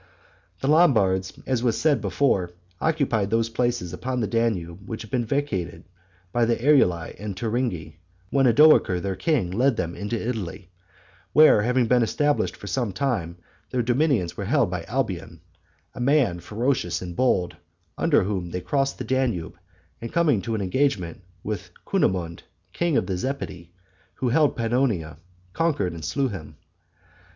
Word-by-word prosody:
The - - -1
Lombards, 110 - +3
as 130 -3 0
was 120 -3 +1
said 145 -7 +2
before, 100 -3 +1 0.3
occupied 135 -11 +1
those 115 +1 +1
places 120 -7 -1
upon 130 0 -3
the 115 - 0
Danube 100 -5 -2
which 110 - -5
had 110 - -13
been 125 -3 0
vacated 100 - -2 0.5
by 120 +2 +2
the 115 0 +2
Eruli 115 - +2
and 105 -1 -5
Turingi, 110 - -2 0.3
when 135 -2 +3
Odoacer 120 - +5
their 95 +1 -3
king 95 - 0
led 125 +5 +2
them 85 -1 -2
into 105 +4 -3
Italy; 100 -6 -5 0.6
where, 150 -7 +7
having 125 +2 +2
been 125 +2 +3
established 145 +6 +1
for - - -11
some 105 +3 -1
time, 95 -7 -2 0.3
their 125 -1 0
dominions 120 - +1
were 100 - -4
held 120 -3 +2
by 85 -2 -4
Alboin, 110 -8 -3 0.5
a - - -10
man 125 - +2
ferocious 110 -2 -1
and 90 -1 -7
bold, 95 -6 +1 0.4
under - - +3
whom 95 -3 -3
they 90 - -3
crossed 135 +6 0
the - - -4
Danube, 120 -9 -1 0.5
and 115 - -6
coming 150 -11 +2
to 115 +1 -3
an 105 - -2
engagement 95 - 0 0.2
with 105 -3 -4 0.2
Cunimund, 85 -3 0 0.3
king 170 -4 +1
of - - +1
the 95 -2 -2
Zepidi, 95 -8 -5 0.5
who 130 - -1
held 150 +3 +3
Pannonia, 115 - -1 0.3
conquered 145 - 0
and 80 -2 -8
slew 135 - 0
him. 80 -7 -8
115 Hz, 155 wpm, -24 LUFS, 90-130 Hz, 0.6 s, where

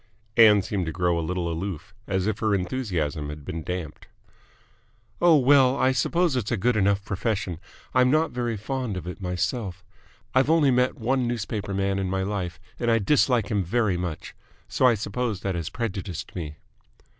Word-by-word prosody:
Ann 105 -4 +7
seemed 95 -3 -2
to - - -1
grow 90 0 +1
a - - -1
little 90 +1 -2
aloof, 85 0 -5
as 95 -1 0
if 110 -1 -1
her 110 -2 +2
enthusiasm 90 - -2
had 75 -1 -8
been 80 - -4
damped. 85 -2 -6 1.1
"Oh, 170 -3 +6
well, 135 -1 +5
I 130 - +3
suppose 165 +5 +1
it's 120 -5 -2
a 120 - +1
good 120 +4 +1
enough 100 -1 +2
profession. 100 -4 -2 0.3
I'm 125 0 +4
not 155 +2 +2
very 120 -2 -2
fond 125 -1 -3
of 90 - -6
it 90 +2 -7
myself. 95 +1 -2 0.5
I've 130 +2 +3
only 160 -4 +4
met 125 +1 +2
one 125 +2 0
newspaper 105 -4 -3
man 100 0 0
in 95 -1 -2
my 95 0 -1
life, 95 -3 -3 0.2
and 120 - 0
I 115 - +4
dislike 120 -1 +2
him 100 -3 +1
very 105 +1 +1
much, 85 -3 -5 0.3
so 130 - +3
I 120 - +4
suppose 105 0 -3
that 95 - -1
has 85 -2 -3
prejudiced 95 -5 -5
me." 75 -4 -5
100 Hz, 180 wpm, -25 LUFS, 90-125 Hz, 1.1 s, Ann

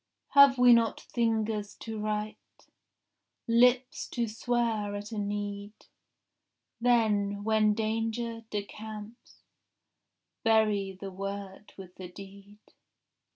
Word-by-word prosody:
Have 280 -2 +7
we 245 -1 +7
not 230 -1 +2
fingers 220 -3 -1
to 220 -1 -7
write, 210 0 -2 1.1
Lips 245 +2 +3
to 235 -2 -2
swear 225 -2 -1
at 205 +1 -7
a 220 - -3
need? 205 0 -4 1.1
Then, 210 -4 +2
when 215 -1 +3
danger 225 +1 -2
decamps, 210 +2 -8 1.0
Bury 215 -4 +2
the 195 0 -6
word 195 +1 -7
with 185 -2 -11
the 185 - -7
deed. 200 +2 -13
215 Hz, 100 wpm, -29 LUFS, 205-230 Hz, 1.1 s, Have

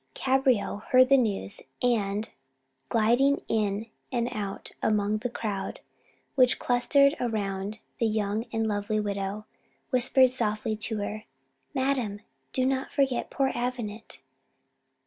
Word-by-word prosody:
Cabriole 260 -6 +2
heard 255 0 +6
the 275 - +7
news, 205 -4 -1 0.2
and, 215 -3 +1 0.6
gliding 240 +6 +3
in 210 -1 0 0.3
and 240 -1 0
out 205 -4 -5
among 210 0 +1
the 245 - -2
crowd 210 -4 -4 0.5
which 255 -2 +4
clustered 280 +4 +3
round 205 -3 -2 0.2
the 230 - +3
young 215 +1 -1
and 225 -1 0
lovely 210 +1 0
widow, 200 0 -3 0.5
whispered 255 0 +4
softly 215 -3 -1
to 220 +1 -3
her 210 +1 -4 0.5
"Madam, 255 -7 0 0.3
do 255 - +1
not 265 0 0
forget 265 -3 +1
poor 270 -1 +1
Avenant." 235 - -4
225 Hz, 120 wpm, -28 LUFS, 210-255 Hz, 0.6 s, the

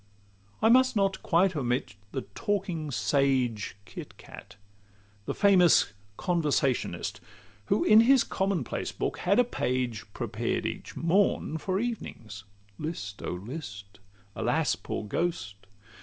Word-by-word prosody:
I 225 - +6
must 255 +1 +5
not 195 -2 +1
quite 180 +2 +2
omit 125 -6 -1 0.2
the 130 - -3
talking 190 -8 -2
sage, 125 -2 +1
Kit - - -10
Cat, - - -12 0.7
the - - -2
famous 180 - +5 0.2
Conversationist, 150 -7 0 0.5
Who, 200 - +2
in 215 +1 +7
his 255 +2 +6
common 190 -5 -1
place - - -4
book, - - -3
had 195 +3 +2
a 245 - +6
page 125 - -2
Prepared 115 0 -2
each - - -5
morn 170 -2 +1
for 190 +4 -1
evenings. 115 - -5 0.3
"List, 125 -11 -5
oh, - - -3
list!" 100 - -8 0.4
"Alas, 135 +6 +1
poor - - -5
ghost!" 100 - -3
155 Hz, 125 wpm, -28 LUFS, -, 0.7 s, in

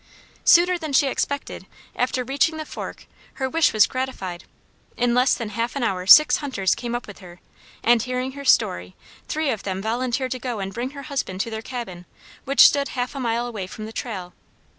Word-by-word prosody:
Sooner 355 +1 +5
than 310 -3 -5
she 275 - +5
expected, 280 +1 -3 0.3
after 250 0 0
reaching 280 +5 0
the 310 - -5
fork, - - -8 0.3
her 265 - -2
wish 325 +4 +2
was 215 -1 +5
gratified. 195 -9 -5 0.5
In 245 -1 +1
less 250 +2 +3
than 230 -4 -5
half 230 +4 -3
an 275 - -2
hour 185 -4 -1
six 305 +9 +8
hunters 255 -10 0
came 240 -1 -4
up 240 - -4
with 205 - -12
her, 175 -2 -13 0.4
and, 235 0 +4
hearing 255 +2 -3
her 280 +1 -9
story, 90 - +2 0.3
three 310 -3 -1
of 215 -5 -3
them 190 -1 -4
volunteered 250 +4 -2
to 255 - -3
go 245 -2 -4
and 195 0 -4
bring 240 +4 -3
her 280 - -7
husband 270 -10 -4
to 230 - -4
their 220 0 -4
cabin, 220 -8 -7 0.4
which 275 0 +3
stood 280 -1 +6
half 250 0 -2
a 275 - -6
mile 235 -1 -1
away 215 -6 -5
from 215 +3 -8
the 220 - -9
trail. 190 -8 -6
245 Hz, 205 wpm, -23 LUFS, 210-270 Hz, 0.5 s, six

